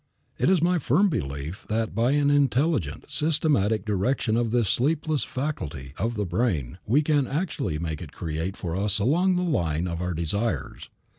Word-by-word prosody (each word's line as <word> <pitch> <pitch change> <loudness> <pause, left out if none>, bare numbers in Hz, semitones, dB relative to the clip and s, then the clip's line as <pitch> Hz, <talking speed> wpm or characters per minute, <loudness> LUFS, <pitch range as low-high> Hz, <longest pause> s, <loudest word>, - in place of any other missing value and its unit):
It - - +3
is 185 -4 +3
my 180 0 +3
firm 170 - +3
belief 70 - -4
that 110 0 -1
by 115 +6 +2
an 145 -1 +3
intelligent, 140 - +1
systematic 145 -9 +1
direction 110 +3 0
of 120 -1 +1
this 120 -2 +1
sleepless 150 - +1
faculty 80 - -4
of 115 +1 -2
the 105 -1 -1
brain 90 - -1
we 140 +8 +3
can 145 -3 +2
actually 145 - -2
make 80 -2 -4
it - - -8
create 80 +4 -4
for 85 -3 -4
us 100 +1 +1
along 170 - +3
the 180 - 0
line 85 - 0
of 85 0 -4
our 90 -1 -2
desires. 100 +8 -2
115 Hz, 170 wpm, -25 LUFS, 85-145 Hz, -, It